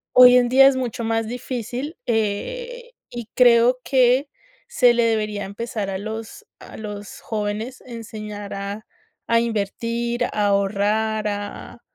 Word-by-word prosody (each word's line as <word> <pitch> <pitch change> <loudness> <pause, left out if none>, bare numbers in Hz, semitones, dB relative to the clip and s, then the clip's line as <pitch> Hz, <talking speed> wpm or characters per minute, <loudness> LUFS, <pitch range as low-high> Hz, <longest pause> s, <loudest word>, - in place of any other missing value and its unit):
Hoy 250 0 +9
en 245 -1 +4
día 270 +1 +7
es 275 - +3
mucho 240 -3 -3
más 225 -1 0
difícil, 250 - -5
eh, 480 - -2 0.2
y 240 -2 -7
creo 245 0 +5
que 260 +1 +3 0.4
se 250 - +4
le 235 0 +2
debería 210 -3 0
empezar 205 0 -4
a 190 - -2
los 220 +2 -7
a - - -12
los 210 -1 -8
jóvenes 215 +3 -4
enseñar 215 -3 -7
a 200 +2 -5 0.4
a 230 0 +4
invertir, 235 +2 -2
a 210 -3 0
ahorrar, 210 +2 +1
a 205 0 -6
225 Hz, 135 wpm, -22 LUFS, 210-245 Hz, 0.4 s, Hoy